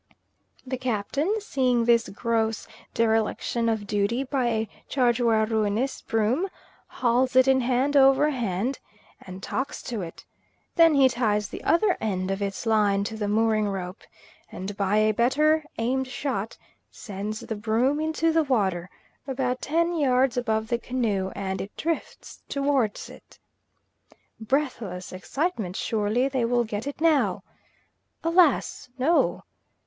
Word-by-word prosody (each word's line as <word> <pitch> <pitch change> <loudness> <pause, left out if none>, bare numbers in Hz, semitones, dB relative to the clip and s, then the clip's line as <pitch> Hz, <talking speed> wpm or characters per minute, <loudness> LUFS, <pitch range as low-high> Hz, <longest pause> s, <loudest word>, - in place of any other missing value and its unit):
The 260 -1 -4
Captain 255 - -1
seeing 255 - +1
this 235 -1 +3
gross 225 +1 -1 0.3
dereliction 230 +1 +1
of 220 -2 -1
duty 205 +5 0
by 270 -1 -1
a 220 -2 -1 0.2
Chargeur 240 -4 +2
Reunis 220 +3 -1
broom, 230 - 0 0.4
hauls 250 +1 +1
it 260 0 +6
in 265 -1 +4
hand 255 +4 +1
over 270 +2 +5
hand 235 0 -2 0.4
and 185 0 -10
talks 265 - -3
to 230 -5 -4
it. 165 -2 -9 0.5
Then 330 -3 +6
he 275 -1 +6
ties 215 -5 0
the - - -8
other 365 +3 +3
end 190 -3 -1
of 195 +1 -3
its 200 +3 -3
line 205 -3 +2
to 220 +2 -4
the 210 -1 -2
mooring 215 0 +2
rope, 185 0 -5 0.5
and 190 +2 -6
by 200 +1 +1
a 215 0 +3
better 300 +7 +3
aimed 255 +3 0
shot 255 -5 -3 0.3
sends 210 0 -6
the 220 - -5
broom 230 +7 +1
into 315 +1 +1
the 325 0 +3
water, 190 - 0 0.4
about 255 -1 -2
ten 335 +3 0
yards 260 -4 +2
above 220 -3 -1
the 235 - 0
canoe, 220 -7 -1
and 190 -1 -3
it 200 - -9
drifts 330 0 -4
towards 275 -6 0
it. - - -15 1.0
Breathless 220 -8 -2
excitement! 215 - -3
surely 220 +5 0
they 260 -3 -1
will 240 +1 +2
get 215 +2 -5
it 285 - -5
now. 320 -4 +2 0.8
Alas, 330 -6 +2
no! 310 +7 +2
235 Hz, 140 wpm, -25 LUFS, 210-270 Hz, 1.0 s, it